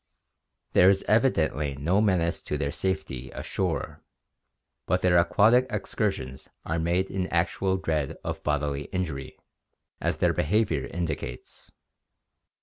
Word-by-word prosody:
There 90 - +7
is 95 0 +2
evi 115 +5 +5
dently 75 - -1
no 85 +9 +2
menace 90 -5 +1
to 75 - -3
their 70 -1 -1
safety 75 -9 -3
ashore - - -3 0.9
but 90 - +1
their 90 -1 +5
aquatic 110 +9 +4
excur - - -1
sions 65 +1 -9 0.2
are 80 - -1
made 85 +3 0
in 95 -1 -1
actual 95 +3 0
dread 80 -6 -2
of - - -4
bodily 75 -1 -1
injury, 80 -8 -4 0.6
as - - -1
their - - +2
behavior 95 -6 +1
indicates. 85 -4 -5
85 Hz, 130 wpm, -27 LUFS, 75-95 Hz, 0.9 s, There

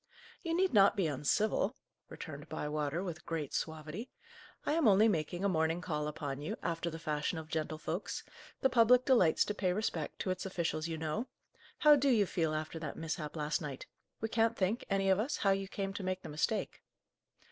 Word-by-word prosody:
"You 330 -2 -1
need 375 -3 +2
not 200 -1 +6
be 190 - +2
uncivil," 190 - +1 0.3
returned - - -8
Bywater, 150 +3 -2
with 175 -4 -5
great 160 -4 -3
suavity. 160 - -4 0.6
"I - - +1
am 320 -5 +3
only 210 +2 +6
making 175 -1 0
a - - +5
morning 165 -2 +1
call 150 -4 -2
upon 145 -2 -4
you, 150 - -3
after 170 0 -1
the 165 - -6
fashion 155 +1 -2
of 160 -1 -6
gentlefolks; 160 +3 -3 0.4
the 265 - +4
public 245 +1 +6
delights 230 - +4
to 210 - -2
pay 190 -3 0
respect 180 -6 -2
to 185 - 0
its 185 - -3
officials, 170 -4 -2
you 165 -1 -3
know. 160 +11 -2 0.5
How 300 -1 +7
do 280 0 +2
you 220 -5 +4
feel 160 -4 0
after 155 +1 -4
that 155 -3 -5
mishap 160 -1 -4
last 150 0 -1
night? 140 -4 -6 0.3
We 225 - -1
can't 225 +1 +2
think, 200 +5 0
any 195 -1 +1
of 190 0 +4
us, 255 +7 -1
how 195 - +3
you 195 0 0
came 195 0 -3
to 200 - -5
make 185 0 -2
the - - -7
mistake." 165 +9 -1
175 Hz, 195 wpm, -33 LUFS, 155-210 Hz, 0.6 s, How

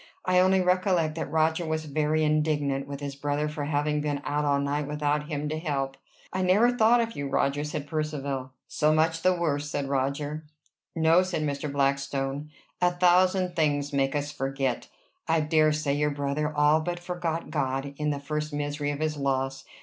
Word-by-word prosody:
I 180 0 +4
only 185 +1 +4
recollect 180 -3 +2
that 160 - -4
Roger 160 +1 +1
was 160 -1 -2
very 155 +1 +1
indignant 150 -3 +1
with 140 0 -6
his 140 -1 -5
brother 145 +1 -1
for 150 -1 -4
having 150 0 0
been 145 -1 -1
out 150 0 0
all 140 -1 +2
night 140 +1 -1
without 150 0 -1
him 150 -1 -3
to 155 +1 -2
help. 135 -4 -2 0.4
"I 190 - -1
never 200 +7 +4
thought 235 +1 +5
of 230 0 -3
you, 140 -1 -3
Roger," 140 +2 +1
said 150 -1 -4
Percivale. 140 -4 -3 0.2
"So 150 0 +2
much 160 +1 +2
the 185 +1 +3
worse!" 145 -4 -1
said 145 -1 -2
Roger. 145 +3 -2 0.5
"No," 165 +2 +5
said 185 -4 -2
Mr. 145 0 -2
Blackstone. 140 +1 -1 0.3
"A 180 - +5
thousand 180 +1 +3
things 145 -3 0
make 135 0 +1
us 145 0 -2
forget. 135 -2 -2 0.4
I 165 0 +3
dare 155 0 +3
say 150 -2 0
your 150 +1 +1
brother 145 +1 -2
all 150 +1 +4
but 175 +2 -3
forgot 175 -2 -3
God 135 -1 -2
in 150 0 -1
the 145 -1 -1
first 150 +2 -3
misery 145 0 -2
of 145 +1 -3
his 155 -1 -1
loss. 135 -1 -1
150 Hz, 185 wpm, -27 LUFS, 140-160 Hz, 0.5 s, thought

